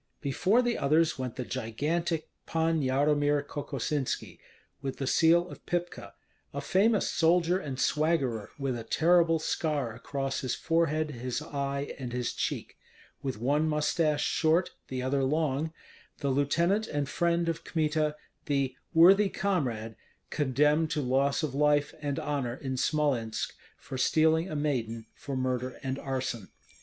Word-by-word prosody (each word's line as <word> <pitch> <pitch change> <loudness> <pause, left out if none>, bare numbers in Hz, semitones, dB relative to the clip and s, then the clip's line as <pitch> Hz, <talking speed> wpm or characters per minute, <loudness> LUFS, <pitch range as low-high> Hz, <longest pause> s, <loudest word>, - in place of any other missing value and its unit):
Before 185 - +2
the 240 -1 0
others 155 +1 +2
went 130 -2 -3
the 125 - -4
gigantic 155 +8 -2 0.2
Pan 165 -1 +1
Yaromir 145 +2 +2
Kokosinski, 145 -1 -3 0.4
with 135 -1 -4
the 135 - -2
seal 170 +5 +4
of - - -11
Pypka, 175 0 -3 0.4
a - - -1
famous 200 +8 +2
soldier 175 +2 +3
and 140 -7 -5
swaggerer, 140 -9 +1
with 135 -3 -1
a 115 - -5
terrible 165 +6 +3
scar 150 -6 -1
across 135 +3 -3
his 130 - -1
forehead, 155 -2 +1
his 125 -1 -3
eye, 140 0 -3
and 125 -2 -5
his 125 -1 -2
cheek, - - -3 0.4
with 135 -5 -3
one 145 +7 +1
mustache 150 0 +1
short, 165 +3 +2 0.2
the 130 -1 -3
other 135 +1 +1
long, 150 +1 0 0.5
the 140 - -2
lieutenant 170 +10 +2
and 145 -1 -2
friend 170 +3 +1
of 165 -1 -2
Kmita, 155 -1 0 0.3
the 140 -3 0 0.2
"worthy 195 +5 +7
comrade," 125 - -1 0.4
condemned 150 +3 +2
to 155 -2 -1
loss 135 +4 +1
of 150 -4 -2
life 145 0 +2
and 145 -2 -2
honor 140 -5 -2
in 130 -1 -4
Smolensk 130 -5 0 0.2
for 130 - -7
stealing 160 +5 +3
a 155 - -4
maiden, 120 -7 -2
for 140 -2 -6
murder 130 0 -2
and 135 +1 -2
arson. 130 -6 -3
145 Hz, 145 wpm, -29 LUFS, 130-160 Hz, 0.5 s, worthy